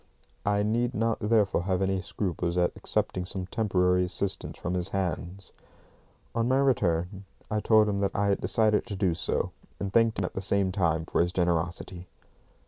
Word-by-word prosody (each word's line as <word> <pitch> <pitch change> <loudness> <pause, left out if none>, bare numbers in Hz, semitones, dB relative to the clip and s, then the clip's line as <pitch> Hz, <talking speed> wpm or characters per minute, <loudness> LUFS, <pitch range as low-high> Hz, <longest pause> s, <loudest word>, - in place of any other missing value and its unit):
I 100 0 +2
need 120 +3 0
not 115 0 0
therefore 105 -4 +2
have 95 -2 0
any 95 -1 0
scruples 90 -2 -3
at 90 -1 +2
accepting 90 - -1
some 95 0 -4
temporary 90 -3 +1
assistance 95 +1 -2
from 90 - -3
his 90 0 -2
hands. 95 0 -3 0.8
On 115 0 0
my 130 +1 +3
return, 100 -8 +1 0.3
I 105 - +1
told 110 0 +4
him 100 -1 -1
that 100 -1 -1
I 100 0 +1
had 100 - +1
decided 110 0 +3
to 105 - -4
do 95 -3 +1
so, 80 - -1 0.3
and 100 -1 -4
thanked 115 -1 +3
him 95 - 0
at - - -5
the 95 - -3
same 100 0 +1
time 85 -4 0
for - - +1
his 85 +1 +1
generosity. 85 0 -1
95 Hz, 180 wpm, -28 LUFS, 90-105 Hz, 0.8 s, told